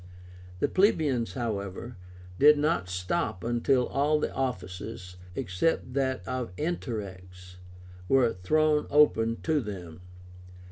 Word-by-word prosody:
The - - +1
plebeians, 155 - +2
however, 110 -1 -4 0.4
did 150 +1 +7
not 150 - 0
stop 90 - -2
until 120 +2 +2
all 150 +2 +1
the - - -2
offices, 95 -5 -5 0.2
except 125 - -1
that 130 -1 -1
of 130 -5 -3
Interrex, 95 - -5 0.5
were 130 -4 +4
thrown 150 +11 +2
open 115 -6 +3
to 160 -2 +2
them. 90 -6 -8
120 Hz, 105 wpm, -28 LUFS, 95-145 Hz, 0.5 s, did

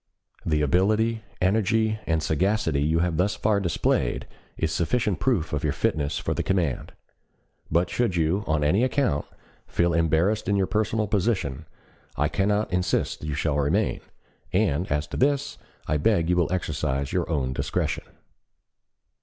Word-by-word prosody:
The 75 -1 +1
ability, 110 +8 +2 0.2
energy, 110 +3 +2
and 80 -1 +1
sagacity 80 -2 +1
you 80 +3 +2
have 85 -3 -2
thus 95 +4 +1
far 105 -1 +1
displayed 85 -4 0 0.3
is 80 - 0
sufficient 105 +4 0
proof 115 -12 0
of - - -1
your - - +1
fitness 70 -2 0
for - - -2
the - - -2
command. 90 -8 -1 0.8
But 85 +2 +1
should 120 -7 0
you, 85 +5 +1
on 75 -1 +1
any 95 +11 +3
account, 130 - +1 0.4
feel 85 0 +1
embarrassed 85 +6 +1
in 100 - +3
your 95 -1 +2
personal 110 +2 0
position, 95 - -1 0.5
I 75 +3 +2
cannot 105 0 0
insist 90 0 0
that 75 - -7
you 75 - -2
shall 75 -1 0
remain; 70 0 +1 0.5
and, 75 +5 +1
as 75 +1 +1
to - - -6
this, 140 +1 +1 0.3
I 75 - 0
beg 85 +1 +2
you - - +3
will 85 -3 +1
exercise 70 -6 -2
your 90 -3 0
own 70 -5 0
discretion. - - -2
90 Hz, 155 wpm, -25 LUFS, 75-105 Hz, 0.8 s, any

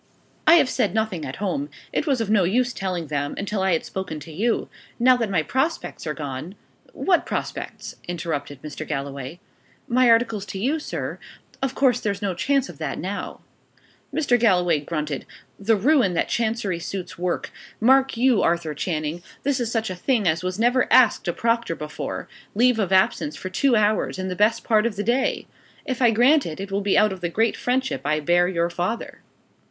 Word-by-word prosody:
"I 325 - +9
have 310 -6 +5
said 210 -5 0
nothing 215 -8 -1
at 130 - -5
home. 280 +9 -2 0.2
It 305 - -1
was 270 -4 +2
of 225 - -1
no 210 -3 +4
use 245 +7 +1
telling 185 -3 -3
them, 145 -1 -2
until 200 0 -2
I 190 -1 +2
had 160 - 0
spoken 190 -5 -5
to 160 - -10
you. 220 +9 0 0.3
Now 255 +1 +5
that 230 -3 -1
my 175 -5 +1
prospects 265 - -2
are 150 - -2
gone 145 +5 -6 0.2
" - - -29
"What 360 -3 +4
prospects?" - - -5
interrupted 160 -5 -4
Mr. 155 +1 -6
Galloway. 140 +1 -5 0.5
"My 250 0 +4
articles 230 -3 +2
to 190 - -5
you, 275 +10 0
sir. - - -5 0.4
Of 270 -1 -1
course 255 -3 +3
there's 200 -4 -2
no 195 -2 0
chance 265 +9 +1
of - - -12
that - - -3
now." - - -5 0.7
Mr. 280 -5 +2
Galloway 180 -8 +3
grunted. 150 -2 -4 0.3
"The 220 +3 +3
ruin 230 - +3
that - - 0
Chancery 220 -6 -1
suits 180 -1 -6
work! 180 0 -2 0.3
Mark 265 +2 +4
you, 245 -2 +4
Arthur 170 -2 +1
Channing, 155 +1 -3 0.2
this 280 -1 +1
is 235 -2 -2
such 225 -4 -1
a - - -4
thing 215 +2 +1
as 160 +2 +2
was 185 0 -2
never 245 +3 +2
asked 235 -7 +5
a - - +2
proctor 230 -5 0
before 150 -1 -5 0.3
leave 245 +1 +4
of 195 -3 0
absence 190 -5 +2
for 185 - -6
two 255 +6 +3
hours 215 -2 +1
in 185 0 -3
the 180 - -3
best 220 +4 +2
part 215 0 +3
of 225 - -4
the 205 - -2
day! 245 +5 0 0.4
If 260 -1 -3
I 240 - +6
grant 255 +7 +4
it, 160 +1 -6
it 195 0 -6
will 200 +1 0
be 200 -1 +2
out 210 -2 +4
of 185 - -10
the 175 - -1
great 225 +6 +1
friendship 260 +1 -1
I 155 +1 +1
bear 175 +4 +3
your 170 -1 0
father." 180 +7 -3
200 Hz, 200 wpm, -23 LUFS, 170-240 Hz, 0.7 s, I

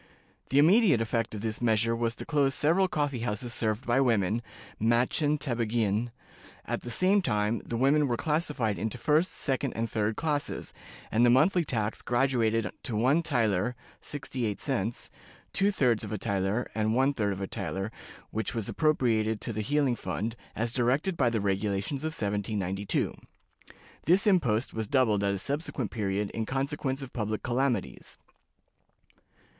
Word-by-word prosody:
The 135 - +1
immediate 170 - +6
effect 115 -1 -1
of 105 - -5
this 110 0 -2
measure 115 0 +2
was 115 0 -1
to - - -7
close 140 -4 +1
several 170 +6 +3
coffee 145 -6 -1
houses 115 +1 -3
served 110 +3 -1
by 120 +3 +3
women 115 -3 +2 0.4
(mädchen 125 +6 +2
tabagieen). 115 -4 0 0.6
At - - -2
the 120 - -7
same 185 - +3
time, 105 - 0
the 115 - -5
women 140 +4 +3
were 120 -2 0
classified 150 - 0
into 110 +3 -3
first, 155 +8 +2
second, 135 -3 -1
and 115 +1 -1
third 110 0 -1
classes, 150 0 -2 0.4
and 115 +2 +3
the 120 - +6
monthly 165 +9 +4
tax 110 -7 -2
graduated 120 -4 +1
to 120 -6 -4
one 130 +9 +3
thaler 120 - +1 0.3
(sixty 135 -5 -3
eight 105 - -3
cents), 120 -5 -2 0.4
two 195 +1 +3
thirds 125 - +2
of - - -6
a 105 - -1
thaler, 100 +3 -1
and 110 0 0
one 135 +3 +3
third 105 -6 0
of 95 - -4
a 100 - -2
thaler, 95 +2 -4 0.4
which 110 +2 -3
was 110 -3 -2
appropriated 115 -8 +1
to 115 - -3
the 110 - -2
healing 140 +2 +1
fund, 110 +3 -3 0.2
as 115 +1 -1
directed 135 +9 +1
by 130 -6 +3
the 115 -1 0
regulations 100 +6 -1
of 160 - -1
1792. 100 -1 -1 0.9
This 185 +5 +4
impost 135 - +2
was 110 -1 -3
doubled 110 -5 +2
at 100 0 +1
a - - -2
subsequent 140 - -3
period 100 -2 -1
in 110 -1 -3
consequence 135 0 -2
of 130 - -9
public 110 -2 -2
calamities. 120 -3 -1
120 Hz, 160 wpm, -29 LUFS, 110-140 Hz, 0.9 s, immediate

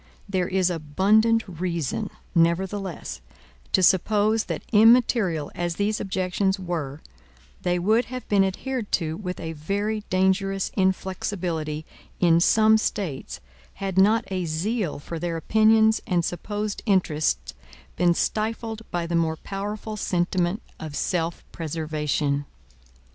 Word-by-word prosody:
There 185 -3 0
is 185 -1 +1
abundant 205 +9 +2
reason, 175 - -2 0.2
nevertheless, 180 - 0 0.5
to 190 - +3
suppose 210 +4 +3
that - - -4
immaterial 220 - +4
as 175 -1 -2
these 205 +2 0
objections 190 +1 0
were, 160 -6 -4 0.6
they 180 0 +1
would 215 +7 +2
have 255 0 -7
been 200 -2 +4
adhered 225 +4 -3
to 160 -2 0
with 180 -1 -5
a 165 -1 -4
very 200 +8 -2
dangerous 190 +1 +1
inflexibility, 180 -5 -1 0.3
in 170 -2 +5
some 220 +4 +5
States, 140 - -3 0.3
had 195 -2 -4
not 215 +4 +5
a 185 -2 -1
zeal 175 +4 -1
for 160 +3 -6
their 170 -1 -2
opinions 220 +4 +4
and 175 -3 +1
supposed 205 +4 -3
interests 175 -6 +1 0.4
been 175 -1 +3
stifled 225 +2 -2
by 175 -1 -2
the 170 - -4
more 165 -1 +1
powerful 210 +3 -5
sentiment 180 +2 0 0.2
of 155 -2 -6
self 170 +1 -1
preservation. 150 -3 -2
185 Hz, 120 wpm, -25 LUFS, 165-210 Hz, 0.6 s, in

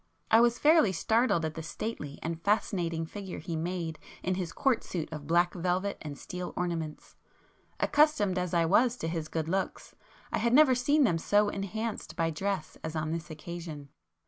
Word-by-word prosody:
I 225 +1 +7
was 240 0 +4
fairly 305 - +5
startled 220 -2 +2
at 155 - -3
the 160 - -6
stately 155 -3 -5
and 165 0 -3
fascinating 175 -5 0
figure 195 +2 -7
he 170 - -5
made 165 -1 -3 0.2
in 185 - +1
his 180 -2 -3
court 270 -3 +1
suit 170 -4 -4
of 145 -2 -7
black 175 +1 +3
velvet 185 +2 -1
and 145 -2 -6
steel 180 -1 -6
ornaments; 165 -4 -3 0.6
accustomed 290 -12 +3
as 180 -1 -2
I 170 -1 +3
was 235 +8 +3
to 160 - -3
his 165 -1 -3
good 160 -1 -2
looks, 190 +2 -2 0.4
I - - 0
had 235 0 +1
never 295 -3 +7
seen 285 +4 +3
them 175 -10 +2
so 205 +4 +3
enhanced 210 +3 -4
by 165 0 +1
dress 190 +1 -3
as 160 0 -4
on 155 0 -1
this 165 +1 -4
occasion. 155 -2 -7
180 Hz, 180 wpm, -30 LUFS, 160-210 Hz, 0.6 s, I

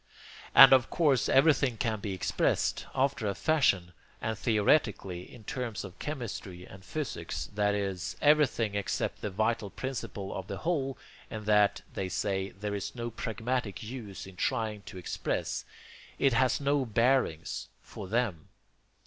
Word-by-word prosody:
And - - +11
of 130 -2 +4
course 145 -7 +2
everything 140 -4 +4
can 110 -2 -1
be 100 0 -4
expressed 95 - 0
after 135 -4 +1
a 100 - -1
fashion, 100 - +2 0.3
and 110 0 -2
'theoretically' 105 - +1
in 120 - -13
terms 125 -5 -4
of 95 -1 -10
chemistry 105 - -5
and 95 -1 -13
physics, 150 +8 -4
that 105 0 +2
is, 95 -3 -3
EVERYTHING 145 -8 +3
EXCEPT 100 -1 -2
THE 105 - -2
VITAL 110 +2 0
PRINCIPLE 105 -6 -5
OF 95 -1 -5
THE - - -4
WHOLE, 140 -6 -1 0.3
and 110 -1 -6
that, 105 -1 +3
they 95 -1 -3
say, 95 +1 -1
there 105 +1 -5
is 100 +3 -4
no 120 -1 -4
pragmatic 115 -3 -3
use 110 -4 -7
in 95 -1 -13
trying 110 -4 -1
to - - -8
express; 90 - -3 0.5
it 135 -3 +3
has 130 +2 +3
no 140 0 +2
bearings 115 - +1 0.2
FOR 95 - -8
THEM. 105 -7 -1
110 Hz, 150 wpm, -30 LUFS, 100-130 Hz, 0.5 s, And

